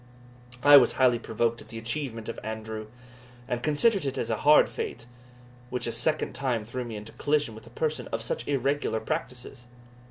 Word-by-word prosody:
I 145 0 +10
was 130 - +5
highly 125 -3 +3
provoked 115 +1 -1
at - - -14
the 115 - -9
achievement 115 -1 -4
of - - -5
Andrew, 110 0 -5 0.6
and 125 -2 -2
considered 175 - +3
it 135 -1 -2
as - - -2
a - - 0
hard 150 +1 +6
fate, 115 - -5 0.6
which 125 0 -3
a 115 - -2
second 155 +7 0
time 125 -6 -1
threw 125 +3 -4
me 115 -2 -7
into 105 +1 -8
collision 145 -5 0
with 110 - -12
a - - -11
person 155 -6 -2
of 115 0 -3
such 115 - -3
irregular 140 -4 0
practices. 125 +1 -5
125 Hz, 185 wpm, -27 LUFS, 115-145 Hz, 0.6 s, I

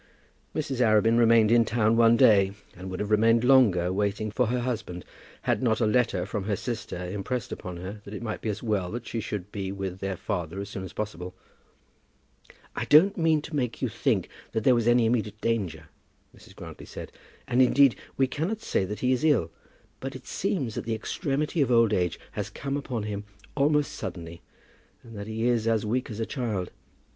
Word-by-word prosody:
Mrs. 145 -4 -2
Arabin 115 0 +4
remained 115 -2 +5
in 120 0 +6
town 115 0 +2
one 115 0 +5
day, 100 -3 +5 0.2
and 95 +1 -8
would 95 - -5
have 105 +1 -3
remained 115 +2 +4
longer, 105 -9 +4
waiting 105 +2 -1
for 125 +3 +1
her 125 +2 0
husband, 110 -8 -4 0.4
had - - +1
not 110 -3 +2
a 115 - +2
letter 115 +2 +1
from 105 -4 -4
her 105 -1 0
sister 115 -3 -5
impressed 120 +6 -4
upon 90 -3 -6
her 95 +4 -7
that 100 - -10
it 110 - -6
might 110 -2 -4
be 110 - -2
as 105 +2 -4
well 105 -6 0
that 120 +4 -5
she 115 - -4
should 105 -2 -5
be 95 -2 -4
with 95 -2 -5
their 95 -1 -3
father 90 -2 -3
as 100 0 -5
soon 95 -1 -6
as 95 - -7
possible. 90 -4 -5 1.4
"I - - -2
don't 185 +7 +6
mean 160 -4 +2
to 155 - -6
make 125 -5 -1
you - - -1
think - - 0 0.3
that 110 - -1
there 130 +1 +5
is 120 -1 +1
any 120 -1 +5
immediate 110 -2 0
danger," 90 -10 -2 0.5
Mrs. - - -17
Grantly - - -10
said, - - -8 0.4
"and, 125 +2 +3
indeed, 135 0 +5 0.2
we 135 - +4
cannot 160 - -2
say 95 - 0
that 105 +2 -6
he 125 - +2
is 130 +1 +1
ill; 120 - +3 0.5
but - - -6
it - - -10
seems 135 - -2
that - - -5
the 115 0 -1
extremity 150 - -2
of 135 - +2
old 115 -2 +4
age 90 -5 0
has 105 0 -4
come 140 +6 -4
upon 130 -6 -3
him 105 -1 -4 0.3
almost 145 +1 +2
suddenly, 85 -1 -7 0.6
and 115 -1 -12
that 100 0 -6
he 110 +1 -2
is 115 -2 +1
as 110 -2 +1
weak 125 +4 -1
as 110 -1 -6
a 115 - 0
child. 110 -9 -3
110 Hz, 205 wpm, -27 LUFS, 100-125 Hz, 1.4 s, in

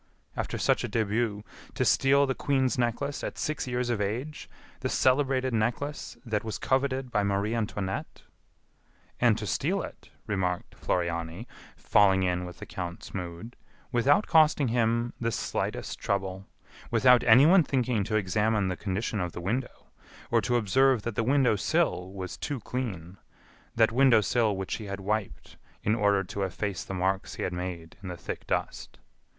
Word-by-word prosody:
"After - - -3
such - - +2
a - - -3
début! 110 -1 0 0.3
To - - +1
steal 140 +1 +4
the 135 - 0
Queen's 130 -1 +1
Necklace 125 +4 -1
at - - -4
six 155 -3 -2
years 125 0 -1
of 110 -3 -1
age; 125 +10 -4 0.3
the - - -2
celebrated 130 -1 +2
necklace 120 +7 -2
that 110 -3 -1
was 110 -3 -4
coveted 130 +2 0
by 105 - +2
Marie 100 +2 0
Antoinette!" 105 -4 -3 1.0
"And - - +4
to - - -4
steal - - 0
it," - - -10 0.2
remarked 95 -4 -2
Floriani, 85 +3 -2 0.3
falling 95 -2 +4
in 90 0 0
with 90 -1 -9
the - - -8
count's 90 -1 -7
mood, 90 +6 -6 0.4
"without 135 - +3
costing 155 -5 +4
him 115 0 +1
the 115 0 0
slightest 110 - -3
trouble, 95 -1 -2 0.4
without 125 +1 +5
anyone 145 +11 +7
thinking 125 -7 0
to 110 - -2
examine 105 0 +1
the 90 - -2
condition 105 +3 -2
of 90 -2 -3
the - - -6
window, 120 +8 -4 0.4
or 115 -1 +4
to 120 +4 0
observe 120 +2 +3
that 120 - -3
the 110 - 0
window 130 -2 +3
sill 90 -1 0
was 95 -2 -6
too 145 -3 -3
clean 100 -8 -5 0.6
that 115 -1 +4
window 125 -1 +5
sill 105 +1 +1
which 95 -1 -3
he 110 - -8
had 100 -1 -5
wiped 105 +1 -3 0.3
in 105 - +2
order 100 -3 +2
to 100 +2 -5
efface 95 0 -3
the 95 - -6
marks 95 +1 -1
he - - -4
had 90 - -2
made 90 -2 -6
in 95 - -8
the 90 - -6
thick - - -7
dust. - - -3
110 Hz, 165 wpm, -28 LUFS, 95-125 Hz, 1.0 s, anyone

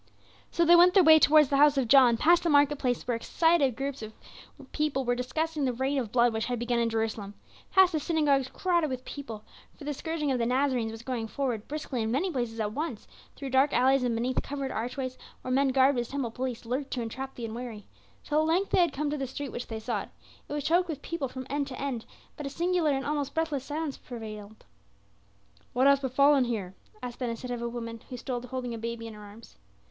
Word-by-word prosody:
So 340 - +1
they 345 +1 +7
went 355 +2 +6
their 385 - +7
way 315 -1 +8
towards 300 -2 +6
the 280 - +2
house 290 0 +5
of 260 -3 +1
John; 250 -2 +6
past 340 +7 +4
the 340 - 0
market 290 -1 +4
places 245 -2 -1
where 245 - +1
excited 290 +2 +2
groups 275 -2 -4 0.5
were 270 -5 -1
discussing 295 +4 -2
the 255 - 0
reign 265 +3 0
of 230 -5 -4
blood 240 -1 +3
which 220 0 -1
had 245 -1 -2
begun 240 0 0
in 230 -1 +1
Jerusalem; 220 -2 -3 0.3
past 380 -2 +5
the 315 - 0
synagogues 290 -4 +1
crowded 345 -1 0
with 255 -1 -5
people 230 -7 -7 0.3
for - - -11
the 295 +1 -2
scourging 305 0 -2
of 255 - 0
the 230 - +1
Nazarenes 250 -3 +1
was 225 +1 -9
going 235 -3 -3
forward 240 -4 -3
briskly 290 -5 -4
in 220 - -1
many 305 +11 0
places 240 -5 -3
at 210 -1 -1
once; 280 -6 -4 0.3
through 275 -2 -6
dark 265 +2 +3
alleys 260 +3 +4
and 245 -2 0
beneath 245 +3 0
covered 275 -1 -4
archways, 255 +3 -4 0.2
where 255 - -4
men 275 +1 +3
garbed 265 0 +3
as 240 - -2
temple 270 -4 -3
police 250 -1 -4
lurked 265 +4 -3
to 250 - -3
entrap 265 +4 -6
the 235 - -5
unwary; 225 -2 -7 0.4
till 300 0 +1
at 310 - +2
length 360 +5 +1
they - - +3
had 340 -5 +2
come 290 +1 -2
to 300 - -2
the 270 -1 -3
street 275 +1 -6
which 245 - -6
they 225 -1 -5
sought. 220 -2 -3 0.4
It - - -4
was 295 -1 -2
choked 345 +4 +2
with 290 -3 -5
people 335 -5 -3
from 260 0 -7
end 285 0 -2
to 255 -2 -7
end; 265 -5 -3 0.3
but 295 -3 -5
a - - -3
singular 345 +2 +1
and 270 -1 0
almost 290 -2 -2
breathless 310 -5 -1
silence 300 -1 -3
prevailed. 220 -3 -9 1.1
"What 255 +1 +2
hath 280 0 +5
befallen 275 +1 +4
here?" 205 -6 -3 0.3
asked 245 -1 -6
Ben 250 -2 -2
Hesed 230 +2 -5
of 240 -1 -3
a 235 - -2
woman 230 -1 -6
who 250 - -6
stood 245 0 -4
holding 250 -1 -4
a 230 - -5
baby 230 0 -5
in 225 - -7
her 210 - -11
arms. 210 +2 -14
260 Hz, 230 wpm, -28 LUFS, 235-290 Hz, 1.1 s, way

